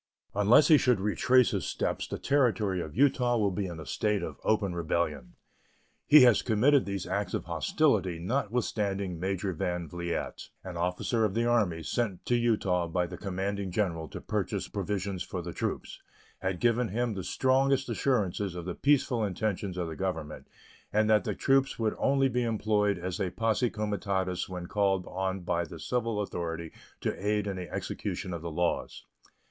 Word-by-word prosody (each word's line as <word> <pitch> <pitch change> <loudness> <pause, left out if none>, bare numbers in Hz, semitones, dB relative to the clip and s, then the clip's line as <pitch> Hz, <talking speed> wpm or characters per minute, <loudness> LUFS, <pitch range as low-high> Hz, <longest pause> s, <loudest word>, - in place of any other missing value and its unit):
Unless 105 +8 +5
he 155 -3 +8
should 125 -5 +3
retrace 110 +6 +3
his 100 -4 -1
steps - - -2
the - - -4
Territory 110 -9 +1
of 80 +2 -7
Utah 125 -3 +3
will 105 -3 +2
be 95 +1 -2
in 85 -2 -7
a 80 - -8
state 105 +3 0
of - - -6
open 105 -4 +1
rebellion. 80 -6 -2 0.7
He 150 0 +9
has 120 -3 +6
committed 130 +5 +3
these 100 -2 -3
acts - - -2
of - - -3
hostility 90 -3 +1
notwithstanding 100 -3 -1
Major 95 +1 -1
Van 90 +1 -2
Vliet, 85 +2 -4
an 95 -2 -7
officer 90 +7 0
of 105 -2 0
the 115 +1 +1
Army, 105 -9 +1
sent 95 - -2
to 120 - +2
Utah 105 -7 +1
by 90 +1 0
the - - -7
Commanding 100 0 -3
General 85 -4 -1
to - - -7
purchase - - -2
provisions 100 -1 -3
for 90 -2 -4
the 85 0 -6
troops, - - -4 0.4
had 95 -2 -2
given 120 0 +2
him 115 +3 -1
the 95 -2 -5
strongest 135 +5 +2
assurances 100 -7 0
of 85 -1 -6
the 90 - -3
peaceful 135 -3 +2
intentions 100 -1 -2
of 90 -2 -2
the 80 - -6
Government, 80 -5 -4 0.4
and 110 +1 +3
that 105 -4 +4
the - - -2
troops 135 0 +2
would 110 -2 0
only 135 0 +3
be 125 -1 0
employed 105 -3 +1
as 90 +2 -4
a 95 -3 0
posse 115 +5 +1
comitatus 100 -4 -2
when 90 -1 -5
called 95 -1 +1
on 95 0 -3
by 85 0 0
the 85 0 -9
civil 115 +2 -1
authority 85 -4 -4 0.3
to - - 0
aid 105 0 +1
in 100 -1 -3
the 90 -3 -6
execution 90 - -4
of 85 - -5
the 85 - -4
laws. 85 +2 -2
100 Hz, 175 wpm, -29 LUFS, 90-115 Hz, 0.7 s, He